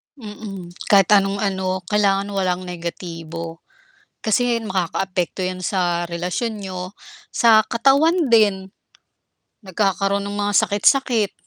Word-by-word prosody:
Mm. 205 -6 -9 0.2
Kahit 200 0 +4
anong 200 0 +3
ano 190 -1 -2
kailangan 200 -1 +1
walang 185 -2 -1
negatibo. 165 -2 -7 0.6
Kasi 230 +1 +1
makakaapekto 185 -1 -2
yan 185 0 -3
sa 175 -2 -1
relasyon 180 +7 -3
niyo, 185 -1 -6 0.5
sa 225 -2 +6
katawan 280 +5 +2
din, 200 -4 +3 0.9
nagkakaroon 195 +1 0
ng 205 - -5
mga 205 0 -1
sakit-sakit. 220 +1 +2
195 Hz, 105 wpm, -21 LUFS, 180-215 Hz, 0.9 s, sa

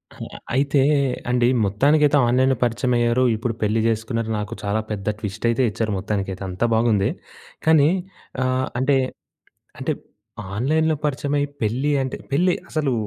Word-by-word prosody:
ఆహా! - - -9 0.2
అయితే 140 +1 +2 0.5
అండి 125 -1 +3 0.2
మొత్తానికైతే 145 +8 +3
ఆన్‍లైన్‍లో 130 +2 +3
పరిచయం 120 +1 0
అయ్యారు. 120 +1 +2
ఇప్పుడు 115 +2 -2
పెళ్లి 110 +1 +1
జేసుకున్నారు. 115 0 -1
నాకు 105 -1 -5
చాలా 100 +1 0
పెద్ద 100 -1 -5
ట్విస్ట్ 105 +1 -5
అయితే 115 +3 +1
ఇచ్చారు 110 +1 -2
మొత్తానికైతే 95 -1 -3
అంతా 90 +6 -1
బావుంది. 110 -3 +2 0.6
కానీ 155 -2 +5 0.5
ఆహ్, 130 0 0
అంటే 135 +2 +3 0.8
అంటే - - -1 0.6
ఆన్‍లైన్‍లో 155 +6 +1
పరిచయమై 145 0 0 0.2
పెళ్లి 125 +7 0
అంటే 130 - -3 0.2
పెళ్లి 180 +6 +3 0.2
అసలు 150 -4 0
120 Hz, 135 wpm, -22 LUFS, 110-140 Hz, 0.8 s, కానీ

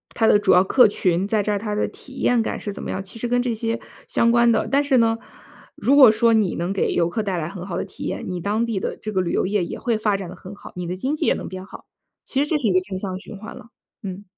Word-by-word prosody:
它 225 - +2
的 210 - +5
主 205 -1 +3
要 180 - +6
客 250 +6 +5
群 185 -2 0
在 210 0 +1
这 210 - -1
儿， 205 - 0
它 210 0 -3
的 210 - +1
体 265 - -14
验 245 -3 +2
感 - - -2
是 205 - -5
怎 200 - -8
么 - - -6
样， 190 - -3
其 195 +4 -11
实 240 - -2
跟 245 +1 +2
这 245 -1 -1
些 230 +1 -2 0.3
相 235 - +2
关 235 0 +4
的。 225 -1 +2
但 280 +1 +4
是 280 -3 +2
呢， 225 -1 +3 0.6
如 275 - +2
果 265 -5 +10
说 225 +1 +3
你 215 -5 +2
能 175 +2 -2
给 195 - 0
游 170 -1 +2
客 220 +6 -2
带 195 -4 -2
来 160 0 -3
很 190 -1 -8
好 185 - -4
的 - - -1
体 - - -10
验， - - -3
你 180 -1 -3
当 210 +6 0
地 225 -4 -2
的 - - -3
这 215 - -6
个 190 - 0
旅 180 -2 -1
游 - - +1
业 195 -1 0
也 - - -6
会 235 -3 0
发 215 -2 +1
展 195 -3 -5
得 185 - -9
很 185 +2 -10
好， - - -12
你 180 -1 -4
的 180 - -3
经 260 +10 -2
济 305 - -1
也 - - +4
能 - - -6
变 185 0 -7
好。 - - -12 0.4
其 265 - -2
实 295 - -5
这 315 - +2
是 270 -6 -1
一 185 - +2
个 185 - +5
正 185 0 -6
向 185 -1 -4
循 205 +1 -10
环 215 - -9
了。 - - -12 0.4
嗯。 195 0 -6
210 Hz, 335 characters per minute, -22 LUFS, 185-230 Hz, 0.6 s, 果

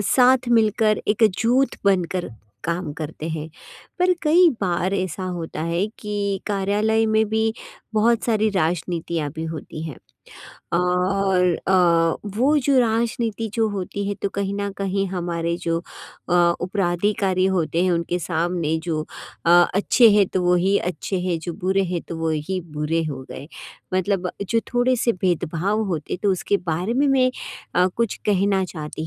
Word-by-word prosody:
साथ 255 0 +5
मिलकर 220 -2 +3
एक 210 +2 +2 0.2
जुट 250 +4 +2
बनकर 180 -3 +1 0.3
काम 170 -2 -2
करते 155 0 -6
हैं। 160 0 -4 0.5
पर 365 0 +4
कई 335 +3 +5
बार 185 +1 0
ऐसा 185 -1 -2
होता 160 -1 -5
है 170 +4 0
कि 200 -2 -2
कार्यालय 210 +3 +1
में 220 0 +2
भी 220 0 +1 0.4
बहुत 230 +2 +2
सारी 220 -2 +2
राजनीतियाँ 165 -2 -1
भी 160 - -4
होती 155 0 -7
हैं। 155 -6 -6 0.8
और 180 +1 +1 0.2
अ, 170 0 +3
वो 285 +5 +4
जो 275 0 +2
राजनीति 230 -1 0
जो 225 -2 +2
होती 200 0 -4
है 205 - -1
तो 200 - +1
कहीं 200 0 -3
न 200 0 -2
कहीं 195 0 -1
हमारे 170 -2 -2
जो 165 0 +1 0.5
अ, 175 - +1 0.3
उपराधिकारी 185 0 0
होते 165 +1 0
हैं, 185 - +2
उनके 170 +1 -1
सामने 165 -1 -1
जो 155 -3 -1 0.4
अ, - - +5 0.2
अच्छे 220 +3 +5
हैं 205 -2 +4
तो 185 - -1
वही 180 +3 +3
अच्छे 180 +2 -3
हैं, 180 -2 -1
जो 170 +1 -5
बुरे 190 +2 0
हैं 170 - -2
तो 165 - -5
वही 160 +3 -2
बुरे 155 +2 -1
हो 130 -1 -6
गए। 140 +4 -8 0.5
मतलब 185 -1 0
जो 230 +3 0
थोड़े-से 245 -1 +2
भेदभाव 180 +3 -1
होते 160 -1 -3
तो 200 - +3
उसके 200 +2 0 0.2
बारे 185 +9 -1
में 285 +2 +3
मैं 255 -1 +3 0.4
अ, 180 +1 +4
कुछ 230 -2 0
कहना 195 -1 +2
चाहती 155 -2 -6
190 Hz, 155 wpm, -22 LUFS, 170-215 Hz, 0.8 s, साथ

